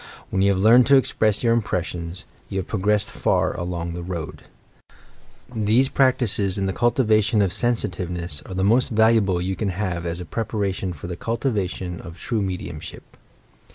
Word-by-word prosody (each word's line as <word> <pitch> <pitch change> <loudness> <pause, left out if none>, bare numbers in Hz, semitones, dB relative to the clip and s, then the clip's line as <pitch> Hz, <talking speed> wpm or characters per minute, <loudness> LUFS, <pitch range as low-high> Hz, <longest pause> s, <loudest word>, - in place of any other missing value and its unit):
When 95 - 0
you 100 +1 +4
have 95 - 0
learned 115 +5 +6
to 140 - +6
express 110 -5 +2
your 115 -1 +3
impressions, 90 -5 -3 0.2
you 95 - -4
have 95 - -2
prog 100 -2 -3
ressed 105 -1 +2
far - - 0
along 85 -1 -4
the 85 - -5
Boad. 85 -3 -6 1.1
These 115 +4 +2
ppaetices 115 -9 +2
in 95 - -1
the 95 - -1
cultivation 110 -2 +2
of 95 -2 -1
sensitiveness 90 -9 0
are 95 - -7
the 95 - 0
most 115 +6 +3
valuable 110 -4 +3
you 95 +2 -2
can 105 0 -2
have 90 -3 -3
as 85 +1 -4
a 90 - -6
preparation 100 -2 -2
for 85 -3 -9
the 85 0 -4
cultivation 95 -6 -3
of 85 -1 -10
true 115 -3 -2
mediumship. 95 -2 -6
100 Hz, 170 wpm, -23 LUFS, 90-110 Hz, 1.1 s, learned